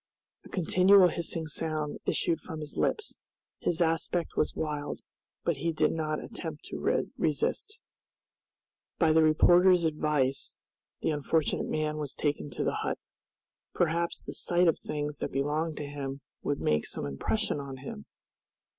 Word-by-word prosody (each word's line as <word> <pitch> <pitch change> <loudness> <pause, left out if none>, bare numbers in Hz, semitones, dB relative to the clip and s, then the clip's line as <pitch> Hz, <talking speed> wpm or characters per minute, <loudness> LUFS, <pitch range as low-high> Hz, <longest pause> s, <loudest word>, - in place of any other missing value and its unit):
A - - -13
continual 185 +1 +5
hissing 165 -1 -3
sound 155 -1 -3
issued 165 - +1
from 160 - -7
his 150 -1 -6
lips, 435 - -1 0.4
his 170 0 +1
aspect 165 +1 0
was - - +1
wild, 150 -2 -3 0.4
but 170 -4 +1
he 165 +4 0
did 155 - +2
not 155 -1 -2
attempt 160 -3 -7
to - - -6 0.4
resist. 420 0 0 1.2
By 160 -2 +4
the 160 +1 +5
reporter's 175 +3 +6
advice 150 -4 0 0.4
the - - +1
unfortunate 150 +1 0
man 155 0 -1
was 145 -3 -4
taken 145 0 -1
to - - -3
the - - 0
hut. - - -1 0.8
Perhaps 170 0 +1
the - - -6
sight 175 0 +2
of 165 - +3
the - - -19
things 150 -1 -3
that - - -3
belonged 150 +4 -1
to 145 - -3
him 140 -1 -5 0.2
would 145 - -1
make 75 0 +1
some - - -4
impression 150 - -1
on 140 -1 -6
him! 130 - -8
155 Hz, 150 wpm, -30 LUFS, 145-170 Hz, 1.2 s, reporter's